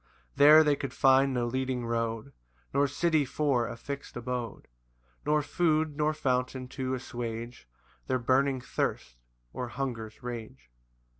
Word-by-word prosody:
4 - - -27
There 150 +2 +9
they 150 -2 +3
could 135 -3 -6
find 135 0 +5
no 125 -2 0
leading 130 0 -2
road, 115 +2 -2 0.4
Nor 140 +1 +3
city 155 +2 +2
for 135 -3 0
a 115 - -6
fix'd 140 +1 -7
abode; 120 -2 -4 0.6
Nor 150 0 +3
food, 155 -1 +1
nor 150 0 +1
fountain 130 -3 -1
to 130 -1 -2
assuage 120 - -6 0.4
Their 130 - +1
burning 130 +2 +2
thirst, - - -3 0.3
or 125 - -4
hunger's 120 -4 -5
rage. 110 - -7
130 Hz, 140 wpm, -29 LUFS, 120-140 Hz, 0.6 s, There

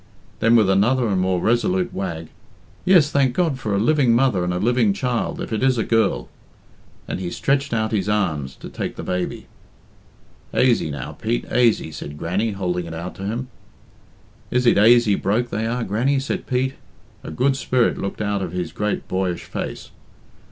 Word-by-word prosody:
Then, 115 +1 +4
with 110 -4 +5
another 115 +6 +3
and 95 -2 +1
more 95 -1 +1
resolute 175 - +1
wag, 85 -4 -4 0.6
"Yes, 175 -6 +5
thank 135 -3 +2
God 160 -7 +1
for 105 -5 -1
a - - +1
living 125 0 +3
mother 120 -7 +2
and 90 - -1
a 90 - -1
living 115 +1 +2
child, 120 +2 -2
if - - -5
it 110 - -1
is 130 -1 +3
a 110 - +1
girl," 115 -1 +1 0.8
and - - -3
he 90 -2 -3
stretched 140 +7 0
out 110 -1 0
his 105 -2 0
arms 80 -11 -1
to - - -7
take - - -5
the - - -7
baby. 90 -1 -3 1.1
"Aisy, 120 -10 +3
now, 70 -4 -5
Pete - - -2
aisy," 115 -8 +2
said 75 -1 -8
Grannie, 100 +8 -1
holding 90 -3 -2
it 80 - -6
out 85 +2 -6
to 95 - -6
him. 120 +4 -3 1.0
"Is 125 0 +1
it 120 - +5
aisy 115 0 +6
broke 110 +5 0
they 110 +2 -1
are, 120 +1 -1
Grannie?" 125 +8 +1
said 135 - -4
Pete. 130 +1 0 0.5
A - - -7
good 130 - +1
spirit 130 -3 +1
looked 100 - -4
out 100 -1 -1
of 90 -3 -3
his 90 -3 -3
great 105 +4 -2
boyish 95 -2 -2
face. - - -6
110 Hz, 185 wpm, -22 LUFS, 95-125 Hz, 1.1 s, aisy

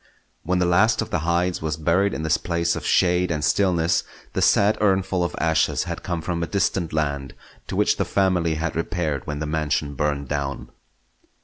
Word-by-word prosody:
When 90 +3 0
the 90 - +2
last 110 +6 +3
of - - -11
the 90 - +1
Hydes 85 +2 0
was 80 -1 -2
buried 85 +6 +1
in 80 - -4
this 80 -1 +2
place 85 -1 -1
of - - -5
shade 90 0 +3
and 75 -2 -1
stillness, 85 -1 +2 0.3
the - - -1
sad 105 +1 +3
urnful 95 -3 +1
of 85 - -3
ashes 80 0 +1
had - - -5
come 85 -2 -3
from 85 -2 -2
a 85 - -1
distant 95 -3 0
land; 70 -4 -2 0.3
to - - -4
which - - +2
the - - +1
family 90 -4 +1
had 80 +2 -3
repaired 80 -5 -2
when 75 -1 -3
the 75 - -3
mansion 75 -1 -1
burned 70 0 -1
down. 70 0 -3
85 Hz, 195 wpm, -23 LUFS, 75-90 Hz, 0.3 s, last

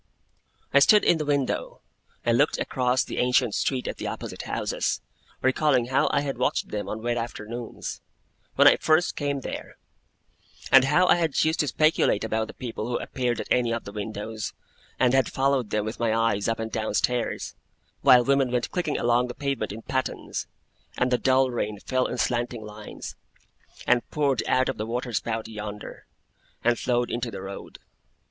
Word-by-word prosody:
I 140 - +7
stood 210 +9 +6
in 160 - +4
a - - -2
window, 140 -2 -1 0.5
and - - +3
looked - - +3
across 125 0 +1
the - - -5
ancient 125 -2 +2
street 130 -2 -1
at - - -4
the - - -4
opposite - - -5
houses, - - -1 0.4
recalling 130 -2 +2
how 130 - +2
I 140 - +2
had 135 -4 -4
watched 125 - 0
them 105 -1 -4
on 110 +1 -5
wet 120 0 0
afternoons, 115 0 -6 0.5
when - - +7
I - - +7
first 160 +2 +2
came 140 -2 -2
there; - - -7 0.9
and 135 0 +8
how 150 +7 +4
I 180 - +5
had 165 -4 +1
used 160 +1 +1
to 150 - +2
speculate 155 -5 +2
about 110 0 -1
the - - -11
people 115 -3 -5
who 120 - -1
appeared 125 -3 -2
at - - -4
any 120 -2 +3
of 115 0 -2
the 100 - -8
windows, 105 +1 -5 0.5
and 125 -1 +4
had 135 -2 +3
followed 135 -4 +1
them 105 -1 -1
with 110 - -5
my 115 -1 +1
eyes 115 -3 +1
up 115 -1 0
and 110 0 -4
down 110 -1 -2
stairs, 125 -1 -1 0.5
while 125 -1 +7
women 135 -1 +3
went 125 -1 -1
clicking 175 -5 -1
along 120 +1 +2
the 125 - -7
pavement 140 -7 -2
in 110 +2 -8
pattens, 130 0 -3 0.5
and 125 0 +1
the 125 - +2
dull 130 0 +3
rain 105 -3 -2
fell 130 +4 0
in - - -4
slanting 120 -2 -1
lines, 105 0 -9 0.7
and 125 -1 +2
poured 140 -5 +1
out 130 0 +3
of 135 - -2
the 110 - -3
water 120 +1 -3
spout 110 0 -2
yonder, 105 -1 -8 0.6
and 120 -1 +2
flowed 120 -1 0
into 120 0 -2
the 95 -3 -7
road. 100 0 -8
125 Hz, 185 wpm, -26 LUFS, 110-135 Hz, 0.9 s, and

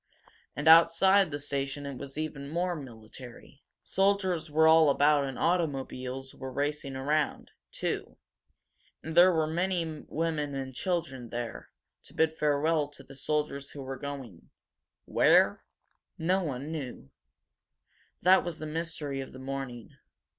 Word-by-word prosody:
And 150 +2 -3
outside 170 +4 +6
the 145 - -3
station 140 0 -3
it 140 -1 -5
was 140 0 -7
even 150 -3 -4
more 175 +3 -1
military. 125 +1 -11 0.2
Soldiers 190 -4 +1
were 160 +2 +4
all 160 -1 +7
about 145 0 +4
and 135 -2 -5
automobiles 135 -6 -2
were 130 -1 -7
racing 145 0 -2
around, 145 +3 -1 0.2
too. - - -4 0.9
And 160 0 -6
there 180 +2 +8
were 160 -2 +1
many 175 +2 0 0.2
women 155 -3 -2
and 135 -1 -5
children 160 -7 -3
here, 120 -1 -5 0.3
to - - -16
bid 160 0 +2
farewell 150 0 +1
to 140 -1 -13
the 135 - -14
soldiers 140 0 -2
who 140 -1 -8
were 135 0 -5
going 135 - -8 0.6
where? - - +4 0.5
No 185 +4 +1
one 140 -1 -4
knew. 130 - -6 1.1
That 185 +2 +6
was 175 -2 -5
the 155 - -6
mystery 155 -3 -3
of 135 - -9
the - - -10
morning. 130 -3 -6
145 Hz, 140 wpm, -29 LUFS, 135-165 Hz, 1.1 s, there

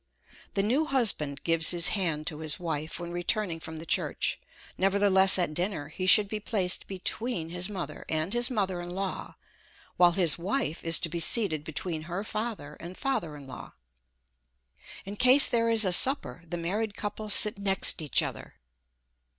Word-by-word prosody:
The 195 - 0
new 265 +9 -1
husband 165 - +1
gives 165 -1 +2
his 170 -2 +4
hand 165 -7 -2
to 155 -1 -6
his 155 -2 -3
wife 160 -2 -5
when 175 0 -8
returning 175 0 -3
from 160 -1 -9
the 160 - -7
church; - - -2 0.4
nevertheless 195 0 +3
at 175 -4 -1
dinner 175 -3 -4
he 185 +4 -6
should 205 +1 +5
be 215 +1 -6
placed 195 -4 -2
between 195 -1 -4
his 180 +3 -2
mother 190 -4 -8
and 160 +5 -3
his 240 0 0
mother 190 -7 -3
in 175 +1 -9
law, 195 0 -6 0.6
while 175 -1 +4
his 170 -4 +1
wife 190 - -3
is 165 0 +4
to 180 - -3
be 170 - -5
seated 165 -3 +5
between 160 +1 -3
her 180 +4 -5
father 215 -9 -6
and 175 +2 -10
father 205 - -4
in 140 - -13
law. 130 - -12 1.3
In 200 +2 -9
case 255 +4 +7
there 230 -1 0
is 225 -2 +4
a 185 - +2
supper, 175 - +3
the 175 - -5
married 200 +5 -4
couple 210 +1 -6
sit 210 0 +5
next 195 -3 +4
each 150 - -1
other. - - -9
185 Hz, 175 wpm, -26 LUFS, 165-210 Hz, 1.3 s, case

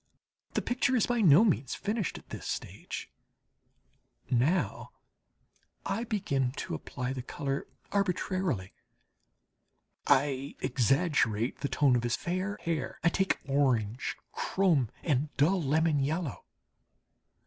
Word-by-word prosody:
The - - +1
picture 250 +1 +1
is 235 - +3
by 240 -1 +1
no 180 +2 +7
means 140 - +1
finished 210 -2 -2
at - - -15
this - - -7
stage. - - -5 1.2
Now 130 +9 +1 0.9
I 225 +5 -1
begin 140 - 0
to - - -5
apply 125 +10 -4
the 130 - -4
colour 135 +2 -3 0.2
arbitrarily. 185 - 0 1.3
I 140 0 +2
exaggerate 130 - +1
the 140 - -2
tone 140 -4 +3
of 120 - +2
his 120 -1 0
fair 185 +4 -2
hair; 165 -2 -2
I 170 - +5
take 190 +3 +1
orange, 130 -5 +1
chrome, 165 - +1
and 145 -1 +1
dull 175 +7 +3
lemon 155 +1 +2
yellow. 150 +1 -2
145 Hz, 115 wpm, -30 LUFS, 130-185 Hz, 1.3 s, no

